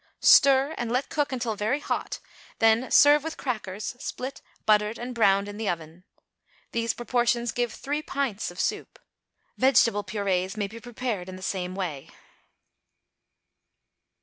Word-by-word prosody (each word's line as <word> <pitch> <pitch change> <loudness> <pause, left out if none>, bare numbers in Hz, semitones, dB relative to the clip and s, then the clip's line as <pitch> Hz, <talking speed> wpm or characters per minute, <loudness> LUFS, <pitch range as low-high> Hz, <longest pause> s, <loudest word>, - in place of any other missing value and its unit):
Stir, 275 +2 +6
and 240 -1 -2
let 255 +3 0
cook 295 -2 -1
until 240 -4 -2
very 220 +8 0
hot; - - -3 0.4
then 225 +3 +3
serve 290 0 +6
with 320 0 -5
crackers, 215 -4 -4
split, 260 +2 -6 0.2
buttered, 210 +1 +3
and 245 +1 -6
browned 200 -3 +3
in 205 0 -7
the 220 -2 -2
oven. 165 +1 -6 0.7
These 230 0 -1
proportions 240 -1 0
give 240 -2 -1
three 290 +2 -3
pints 270 -8 -2
of 175 +1 -11
soup. - - -2 0.6
Vegetable 230 -5 +4
purées 190 -1 -2
may 205 - 0
be 220 +3 -9
prepared 230 -6 -4
in 185 - -7
the 185 - -10
same 185 -1 -3
way. 165 -8 -4
225 Hz, 145 wpm, -26 LUFS, 195-255 Hz, 0.7 s, Stir